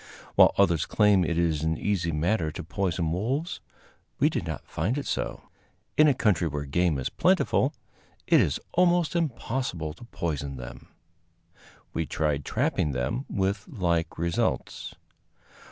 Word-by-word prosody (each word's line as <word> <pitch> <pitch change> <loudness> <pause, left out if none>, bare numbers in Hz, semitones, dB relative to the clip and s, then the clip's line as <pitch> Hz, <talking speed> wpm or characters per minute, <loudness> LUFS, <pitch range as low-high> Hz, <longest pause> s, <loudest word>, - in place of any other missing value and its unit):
While - - +6
others 85 -6 +3
claim 105 -3 +4
it 85 0 -1
is 80 -3 +1
an 80 0 0
easy 90 -5 0
matter 80 +1 0
to - - -6
poison 85 -1 -1
wolves, 135 - -2 0.6
we - - +3
did - - -3
not - - -5
find 100 - -1
it 145 - -3
so. - - -3 0.5
In 155 - +6
a 140 - +4
country 95 -8 +2
where 75 -1 -3
game 85 +2 +1
is 65 - -2
plentiful, - - +2 0.5
it - - +5
is - - 0
almost 175 -1 +3
impossible 120 - -2
to 90 - -13
poison 75 - -3
them. 60 -1 -9 1.1
We 80 - -1
tried 75 -3 -1
trapping 75 - 0
them, 65 - -2
with 100 0 -1
like 85 -6 -1
results. 85 0 -2
85 Hz, 145 wpm, -27 LUFS, 80-110 Hz, 1.1 s, While